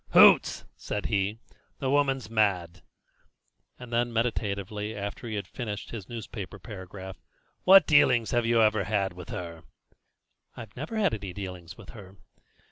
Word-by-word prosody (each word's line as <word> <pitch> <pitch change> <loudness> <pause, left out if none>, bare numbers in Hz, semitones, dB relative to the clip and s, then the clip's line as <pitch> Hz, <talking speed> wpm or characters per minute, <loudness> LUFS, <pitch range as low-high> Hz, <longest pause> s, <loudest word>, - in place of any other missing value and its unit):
"Hoots!" - - +6
said 105 - -4
he; 100 0 0 0.4
"the 135 -1 -1
woman's 135 -4 +1
mad!" 90 -6 0 1.0
And 125 -1 -10
then 120 0 +1
meditatively, 105 -2 -2
after 100 +3 -5
he 110 - -4
had 100 -2 -3
finished 105 -3 -6
his 105 -6 -7
newspaper 105 -4 -7
paragraph: 95 0 -9 0.4
"What 190 -3 +9
dealings 135 -7 +4
have 120 -1 +2
you 115 -1 +4
ever 105 -2 +2
had 100 -3 0
with 90 0 -10
her?" 85 -2 -6 1.0
"I - - -6
never 155 - -5
had 200 -4 +2
any 100 -4 -5
dealings 90 -2 -8
with 115 -5 -13
her." 95 -3 -12
105 Hz, 145 wpm, -28 LUFS, 95-120 Hz, 1.0 s, What